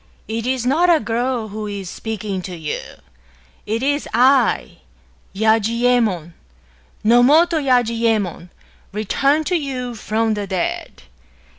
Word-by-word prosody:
It 225 +2 -3
is 255 -2 -1
not 320 +8 +3
a 335 -2 +5
girl 235 -2 -2
who 210 +1 -5
is 200 -2 -5
speaking 210 -1 -4
to 180 0 -7
you; 160 -3 -4 0.9
it 225 +4 -1
is 285 +1 0
I, 255 0 +3 0.3
— 65 - -34
Yajiyemon, 220 -5 +2 0.7
Nomoto 295 +9 +5
Yajiyemon, 230 - +1 0.2
— - - -32
returned 275 +9 +1
to 360 - 0
you 260 -6 -3
from 220 0 -1
the 205 -1 -4
dead. 185 -2 -3
230 Hz, 125 wpm, -20 LUFS, 210-260 Hz, 0.9 s, a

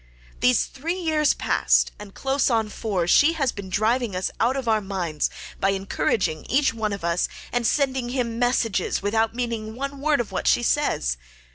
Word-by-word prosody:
This 250 -1 +3
three 330 +7 -4
years 310 -4 +2
past, - - +2
and 205 -2 -11
close 270 0 +1
on 225 -3 +1
four, 200 -5 -2
she 290 - +5
had 275 -6 0
been 200 -2 -7
driving 220 +2 +1
us 185 +1 -1
out 240 +4 +2
of 260 -3 -4
our 220 -1 +3
minds, 180 -6 -2 0.3
by 195 - +2
encouraging 190 -4 -1
each 275 0 +3
one 220 -2 -2
of 200 -3 -5
us, 170 +1 +1 0.2
and 245 -1 +1
sending 265 -4 0
him 240 -3 -2
messages 235 -7 +1
without 220 +2 +1
meaning 230 -3 -3
one 275 +2 -5
word 295 -1 +2
of 240 - -3
what - - -2
she 240 - +4
says. 60 - +1
230 Hz, 180 wpm, -24 LUFS, 200-265 Hz, 0.3 s, she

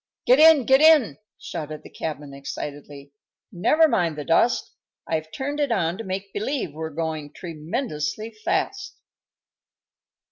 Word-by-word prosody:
"Get 255 +3 +5
in! 310 -5 +7
Get 265 +3 +5
in!" 310 -10 +5 0.2
shouted 155 -2 -7
the - - -12
cabman, 150 -3 -6
excitedly. 140 0 -8 0.4
"Never 305 - +4
mind 170 - 0
the 150 - -5
dust; 230 +9 +2 0.3
I've 160 -1 -3
turned 285 - -4
it 285 -4 0
on 175 -3 0
to - - -4
make 190 0 -5
believe 220 - -2
we're 160 +1 -5
going 155 -1 -4
tremendously 170 - -4
fast." 395 - -2
175 Hz, 135 wpm, -24 LUFS, 155-255 Hz, 0.4 s, in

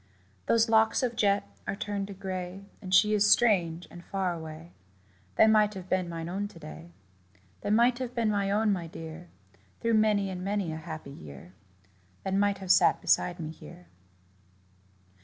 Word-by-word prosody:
Those 230 0 +4
locks 220 +3 +3
of 240 -2 -1
jet 205 -3 +1 0.2
are - - -2
turned 200 -1 -3
to 200 - -8
gray, 185 0 -6 0.2
And 185 - -8
she 210 +3 +5
is 210 0 +3
strange 180 -8 +3
and 175 - -11
far 190 -2 -2
away 160 0 -9 0.6
That - - +6
might 210 -1 +3
have 185 -1 -8
been 185 -2 0
mine 165 -1 -5
own 195 +4 -3
to 205 - -15
day 165 +1 -10 0.7
That - - -2
might 240 +3 +4
have 250 -1 -5
been 230 -3 +1
mine 200 -1 0
own, 210 +1 +2
my 175 -3 -4
dear, 165 +1 -9 0.5
Through 230 0 0
many 210 -3 +2
and 180 -1 -6
many 200 -3 -1
a - - -5
happy 155 -3 -8
year 75 - -12 0.7
That 190 - -2
might 200 0 +2
have 190 -2 -1
sat - - +5
beside 175 0 +1
me 155 -1 -5
here. 175 +2 -14
195 Hz, 175 wpm, -28 LUFS, 170-210 Hz, 0.7 s, That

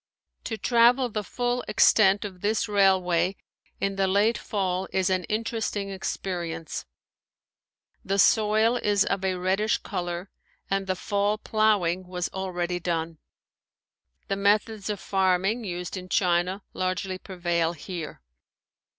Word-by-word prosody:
To 220 - -3
travel 245 +2 +4
the 215 -1 -3
full 245 +4 -2
extent 205 -1 +4
of 185 -3 -8
this 215 +2 0
railway 190 -3 +3 0.4
in 195 0 -1
the 195 -1 +2
late 205 +4 +3
fall 190 -3 -2
is 190 0 +1
an 185 -2 0
interesting 215 -2 -2
experience. 170 -4 -4 1.2
The 195 +1 -1
soil 220 +3 +4
is 205 -3 +2
of 195 -1 -1
a 190 -1 +1
reddish 190 +4 +1
color 175 0 -5 0.4
and 195 0 0
the 185 - 0
fall 205 +2 0
plowing 205 -5 +1
was 180 -1 -3
already 180 -2 -3
done. 165 -2 -3 1.1
The 195 - -1
methods 205 +1 +1
of 205 -2 -2
farming 190 +4 +1
used 180 -1 -4
in 185 -1 -7
China 180 +2 +1
largely 185 0 -2
prevail 175 -3 -1
here. 165 - -7
195 Hz, 125 wpm, -26 LUFS, 180-210 Hz, 1.2 s, travel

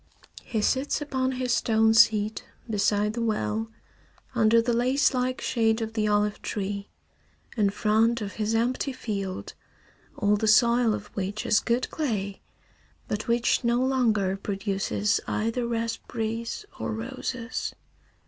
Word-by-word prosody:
He 220 -3 -2
sits 265 +5 +1
upon 265 -3 -1
his 250 -1 -1
stone 220 -1 +3
seat 215 -1 +4 0.2
beside 210 -1 +1
the 235 - -3
well, 220 0 -1 0.6
under 230 -1 +4
the 235 +1 +1
lace 255 +5 +2
like 255 0 -1
shade 225 -1 +1
of 225 -1 -4
the 215 -2 0
olive 210 0 +1
tree, 200 0 -4 0.7
in 210 -3 +3
front 220 +3 +2
of 205 -2 -5
his 215 +1 -1
empty 250 +4 0
field, 200 -6 -4 0.6
all 210 -1 +2
the 220 - -1
soil 235 +1 +4
of 205 0 -7
which 200 +2 -3
is 210 - +4
good 240 +2 0
clay 205 -10 -2 0.7
but 210 +1 -3
which 235 +2 +2
no 235 0 +2
longer 230 -7 +2
produces 200 +1 -1
either 230 +2 -1
raspberries 230 - -3
or - - -2
roses. 235 +1 -4
225 Hz, 135 wpm, -26 LUFS, 210-240 Hz, 0.7 s, seat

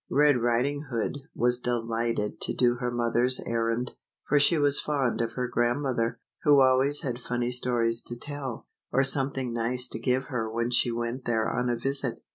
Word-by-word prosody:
Red 145 0 +4
Riding 130 +5 0
Hood 120 +3 -2 0.2
was 120 +1 +1
delighted 115 -3 -2
to - - -1
do 120 -1 +2
her 125 0 -2
mother's 120 +1 +2
errand, 115 +1 -1 0.4
for 145 - +4
she 155 +4 +4
was 145 -1 +4
fond 135 -6 -1
of 115 0 -2
her 125 +1 -2
grandmother, 120 -1 0 0.2
who 145 -2 +5
always 130 +2 +3
had 125 -3 -3
funny 120 0 -2
stories 120 -2 0
to 120 - -4
tell, 140 -2 -6 0.3
or 135 - +3
something 135 -2 -1
nice 125 +2 0
to - - -5
give 130 +2 0
her 115 -4 -3
when 115 +1 -1
she 120 0 +2
went 120 +2 -4
there 110 -2 +1
on 125 0 -1
a 120 - +1
visit. 135 0 0
125 Hz, 180 wpm, -27 LUFS, 115-135 Hz, 0.4 s, who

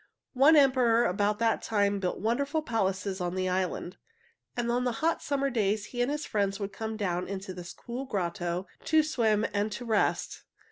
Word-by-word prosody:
One 280 +5 +6
emperor 255 -5 +5
about 205 +3 +1
that 225 0 +1
time 205 -2 +1
built 185 -2 -2
wonderful 280 +8 0
palaces 195 -5 -1
on 175 0 -2
the 185 0 0
island, 185 0 -2 0.6
and 240 -1 0
on 245 +1 +1
hot 310 +8 0
summer 275 -1 0
days 210 -2 0
he 245 - -1
and 245 - +1
his 295 +1 -2
friends 200 -1 -1
would 200 -1 -4
come 220 +1 -4
down 180 -4 -1
into 195 -1 -5
this 175 -1 -8
cool 245 +3 -6
grotto 175 -4 -2 0.2
to 315 -1 +4
swim 225 -8 +1
and 205 +1 0
to 245 - -6
rest. 220 -3 0
215 Hz, 180 wpm, -29 LUFS, 195-245 Hz, 0.6 s, One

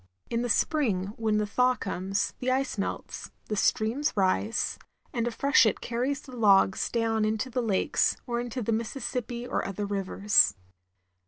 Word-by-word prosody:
In 230 0 0
the 245 - -2
spring, 210 - +1
when 220 -2 0
the 210 - +1
thaw 250 +5 +2
comes, 195 -1 -2
the 255 - -1
ice 265 +1 0
melts, 195 - -4 0.2
the 210 - -1
streams 230 +8 +1
rise, 200 +4 0 0.3
and 235 -1 -1
a - - +2
freshet 235 -3 +3
carries 250 +4 -2
the 260 -3 -11
logs 200 -4 +4
down 225 -2 0
into 215 +4 -1
the 250 - 0
lakes, 210 -5 +1
or 235 -2 -2
into 245 0 -4
the 230 - -1
Mis 225 +2 -2
sissippi 245 -1 -4
or - - -1
other 195 +1 -4
drivers. 200 0 +3
225 Hz, 165 wpm, -28 LUFS, 205-250 Hz, 0.3 s, logs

